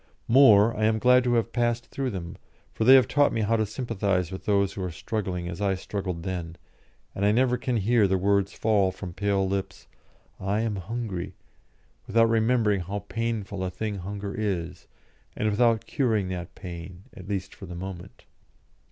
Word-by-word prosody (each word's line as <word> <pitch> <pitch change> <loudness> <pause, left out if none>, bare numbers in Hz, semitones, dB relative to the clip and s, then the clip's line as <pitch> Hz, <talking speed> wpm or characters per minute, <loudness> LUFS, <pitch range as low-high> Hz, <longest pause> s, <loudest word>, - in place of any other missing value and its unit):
More, 115 -4 +6
I 110 - 0
am 110 0 +2
glad 125 +2 +5
to 120 -1 +2
have 115 0 0
passed 120 -1 -1
through 135 -1 -2
them, 90 -3 -6 0.4
for 110 - -1
they 130 +2 +9
have 130 -5 +6
taught 145 0 +3
me 115 - -1
how 110 +2 +2
to 110 -1 0
sympathise 100 -6 -1
with 95 - -7
those 100 -2 +2
who 100 - -6
are 90 - -2
struggling 90 +1 -4
as 90 +2 -6
I 100 -1 +1
struggled 90 -3 -4
then, 85 -3 -4 0.6
and 100 - -3
I 105 - +4
never 125 +2 +3
can 125 -1 -1
hear 110 0 +3
the 95 0 +1
words 100 +1 +1
fall 100 -4 +2
from 95 -2 -8
pale 100 0 0
lips, 95 0 -4 0.5
"I 100 +3 -1
am 110 -3 -1
hungry," 95 -2 -5 0.7
without 115 +2 +4
remembering 110 -2 +2
how 100 +3 -5
painful 110 -4 -3
a 95 - -1
thing 105 +1 -4
hunger 100 +2 -5
is, 95 -6 -3 0.5
and 110 0 +1
without 115 +1 +2
curing 110 -9 0
that 90 0 -6
pain, 90 0 -9
at 95 - -11
least 95 -2 -3
for 95 - -11
the 90 - -8
moment. 95 +1 -8
100 Hz, 185 wpm, -26 LUFS, 95-115 Hz, 0.7 s, they